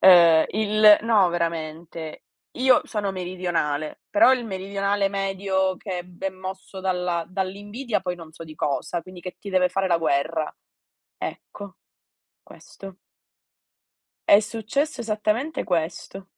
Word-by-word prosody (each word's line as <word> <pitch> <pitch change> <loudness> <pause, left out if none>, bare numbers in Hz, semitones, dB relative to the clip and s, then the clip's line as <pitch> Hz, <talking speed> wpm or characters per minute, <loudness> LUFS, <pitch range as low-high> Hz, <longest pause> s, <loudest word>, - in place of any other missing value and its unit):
uhm, 170 -4 +8
il 215 0 +5
no, 215 -5 +4
veramente, 165 -1 -4 0.3
io 255 0 +5
sono 205 -3 -2
meridionale, 175 -5 -2
però 225 +5 +6
il 255 -2 0
meridionale 200 0 -1
medio 195 -1 -1
che 185 -2 -5
è - - -8
be 180 +1 -7
è - - 0
mosso 190 +1 -8
dalla 180 -2 -1
dall'invidia, 205 +6 -3
poi 180 - -3
non 165 -2 -12
so 165 - -10
di 155 -1 -11
cosa, 150 +4 -2
quindi 185 +1 -12
che 180 0 -8
ti 205 - -9
deve 185 -1 +3
fare 195 +1 0
la 170 - +4
guerra. 155 0 0 0.6
Ecco. 200 -2 -7 0.7
Questo. 195 -1 -12 1.4
È 200 - +9
successo 225 +7 -2
esattamente 225 +6 -1
questo. 175 +2 -3
190 Hz, 130 wpm, -24 LUFS, 175-205 Hz, 1.4 s, È